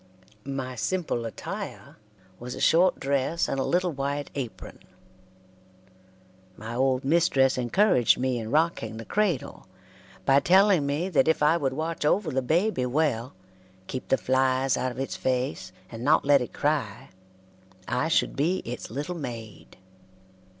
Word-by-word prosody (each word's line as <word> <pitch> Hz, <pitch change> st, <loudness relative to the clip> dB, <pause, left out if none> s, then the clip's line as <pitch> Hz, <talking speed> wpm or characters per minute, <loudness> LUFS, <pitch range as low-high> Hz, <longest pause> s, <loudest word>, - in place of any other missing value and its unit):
My 135 Hz, -2 st, -4 dB
simple 120 Hz, -, -2 dB
attire 110 Hz, -, -7 dB, 0.4 s
was 125 Hz, +1 st, -6 dB
a -, -, -8 dB
short 180 Hz, +3 st, +4 dB
dress 140 Hz, +4 st, 0 dB
and 135 Hz, -, -2 dB
a -, -, +1 dB
little 180 Hz, +3 st, +1 dB
white 140 Hz, 0 st, -3 dB
apron. 130 Hz, -5 st, -7 dB, 1.8 s
My 110 Hz, +2 st, -7 dB
old 130 Hz, +1 st, +1 dB
mistress 140 Hz, -4 st, +3 dB
encouraged 125 Hz, -, +3 dB
me 130 Hz, -1 st, -1 dB
in 110 Hz, -1 st, -6 dB
rocking 150 Hz, -7 st, 0 dB
the 115 Hz, -, -8 dB
cradle, 195 Hz, -, -1 dB, 0.6 s
by 135 Hz, 0 st, +5 dB
telling 185 Hz, -3 st, +4 dB
me 150 Hz, +6 st, -1 dB
that 155 Hz, -6 st, +2 dB
if 160 Hz, -1 st, +2 dB
I 150 Hz, +2 st, +5 dB
would 140 Hz, -6 st, -1 dB
watch 160 Hz, +3 st, -3 dB
over 160 Hz, +3 st, +1 dB
the 130 Hz, 0 st, 0 dB
baby 160 Hz, -, +1 dB
well, 130 Hz, -5 st, -1 dB, 0.5 s
keep 130 Hz, +6 st, -6 dB
the 135 Hz, -, +3 dB
flies 130 Hz, 0 st, +1 dB
out 130 Hz, -, -1 dB
of 120 Hz, -, -11 dB
its 135 Hz, +1 st, -3 dB
face, 125 Hz, -8 st, -2 dB, 0.2 s
and 115 Hz, 0 st, -7 dB
not 145 Hz, +2 st, +3 dB
let 140 Hz, -1 st, +5 dB
it 125 Hz, -, -5 dB
cry, 140 Hz, -8 st, -2 dB, 0.8 s
I 125 Hz, +5 st, 0 dB
should 165 Hz, -, +1 dB
be 165 Hz, +7 st, 0 dB
its 120 Hz, +1 st, -6 dB
little 145 Hz, +9 st, -4 dB
maid. 115 Hz, -, -8 dB
135 Hz, 150 wpm, -26 LUFS, 125-160 Hz, 1.8 s, by